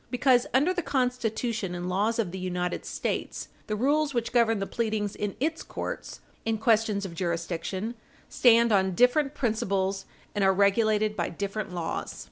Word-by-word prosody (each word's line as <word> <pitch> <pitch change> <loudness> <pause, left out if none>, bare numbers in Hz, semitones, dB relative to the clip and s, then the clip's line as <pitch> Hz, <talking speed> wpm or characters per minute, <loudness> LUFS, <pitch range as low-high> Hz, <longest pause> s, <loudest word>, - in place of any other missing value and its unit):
Because, 250 0 +3
under 290 +8 +3
the 360 - -1
Constitution 240 - -1
and 175 0 -4
laws 205 +5 +1
of 210 -7 -1
the 190 - -5
United 180 -1 -3
States, - - -3 0.2
the 215 - -1
rules 285 +4 +1
which 235 -1 -1
govern 230 -2 +3
the 195 - -2
pleadings 215 -2 -2
in 205 -2 -3
its 315 +4 -1
courts - - -6 0.2
in 225 0 0
questions 215 -2 +2
of 180 - -6
jurisdiction 170 +4 -3 0.3
stand 235 -1 +5
on 190 -2 +2
different 270 - +3
principles, 195 -6 -1 0.3
and 205 - 0
are 190 0 +5
regulated 210 +2 +3
by - - -1
different 200 +2 -4
laws. 170 -2 -4
215 Hz, 160 wpm, -27 LUFS, 190-240 Hz, 0.3 s, stand